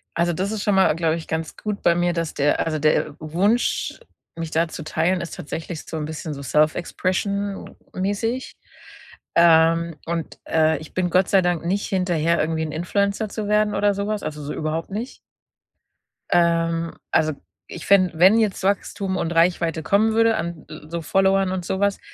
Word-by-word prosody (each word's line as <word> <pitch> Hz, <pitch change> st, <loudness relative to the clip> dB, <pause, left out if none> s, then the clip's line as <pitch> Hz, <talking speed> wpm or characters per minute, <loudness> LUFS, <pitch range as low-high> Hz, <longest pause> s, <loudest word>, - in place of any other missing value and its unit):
Also, 170 Hz, +1 st, +1 dB
das 190 Hz, +5 st, -2 dB
ist 215 Hz, -2 st, -3 dB
schon 205 Hz, -, +2 dB
mal, 190 Hz, -4 st, +4 dB
glaube 165 Hz, -1 st, +1 dB
ich, 165 Hz, -, -7 dB
ganz 160 Hz, 0 st, -3 dB
gut 210 Hz, -1 st, -4 dB
bei 170 Hz, -, +3 dB
mir, 175 Hz, 0 st, +1 dB
dass 165 Hz, -2 st, -2 dB
der 145 Hz, +1 st, +1 dB
also, 155 Hz, -1 st, -1 dB
der 150 Hz, -1 st, +1 dB
Wunsch, 190 Hz, +10 st, 0 dB, 0.4 s
mich 165 Hz, -1 st, -5 dB
da 165 Hz, +1 st, +1 dB
zu 160 Hz, -, -7 dB
teilen, 165 Hz, +4 st, 0 dB
ist 170 Hz, -, -6 dB
tatsächlich 160 Hz, +2 st, -6 dB
so 160 Hz, -, -5 dB
'n 150 Hz, -, -3 dB
bisschen 155 Hz, 0 st, -5 dB
so 140 Hz, -, -8 dB
Self-Expression 185 Hz, +7 st, -1 dB, 0.2 s
mäßig. 205 Hz, +7 st, -2 dB, 0.8 s
Ähm, 165 Hz, 0 st, +4 dB
und, 165 Hz, -1 st, -4 dB
äh, 160 Hz, -1 st, +2 dB
ich 155 Hz, -, -12 dB
bin 185 Hz, -1 st, 0 dB
Gott 185 Hz, +2 st, +2 dB
sei 195 Hz, -, +5 dB
Dank 175 Hz, -2 st, -1 dB
nicht 195 Hz, +4 st, -1 dB
hinterher 170 Hz, -3 st, +1 dB
irgendwie 160 Hz, +1 st, -1 dB
'n 155 Hz, -, -4 dB
Influencer 200 Hz, +6 st, -1 dB
zu 210 Hz, 0 st, -4 dB
werden 210 Hz, 0 st, +2 dB
oder 205 Hz, 0 st, +2 dB
so 200 Hz, +1 st, -3 dB
was, 215 Hz, -1 st, -2 dB
also, 150 Hz, -1 st, -5 dB
so 145 Hz, -, -4 dB
überhaupt 160 Hz, +1 st, -3 dB
nicht. 225 Hz, +6 st, -5 dB, 1.1 s
Ähm, 165 Hz, -1 st, +1 dB, 0.2 s
also, 155 Hz, 0 st, +2 dB, 0.3 s
ich 170 Hz, -, -8 dB
fände 185 Hz, -4 st, +4 dB
wenn 190 Hz, +5 st, +7 dB
jetzt 215 Hz, -4 st, 0 dB
Wachstum 195 Hz, 0 st, -1 dB
und 165 Hz, -, -2 dB
Reichweite 165 Hz, -1 st, +2 dB
kommen 210 Hz, +6 st, +2 dB
würde 225 Hz, 0 st, +3 dB
an 170 Hz, -6 st, -4 dB, 0.2 s
so 170 Hz, 0 st, -4 dB
Followern 195 Hz, +2 st, +2 dB
und 185 Hz, -1 st, -3 dB
so 190 Hz, -, -2 dB
was, 200 Hz, 0 st, +1 dB
175 Hz, 180 wpm, -22 LUFS, 160-200 Hz, 1.1 s, wenn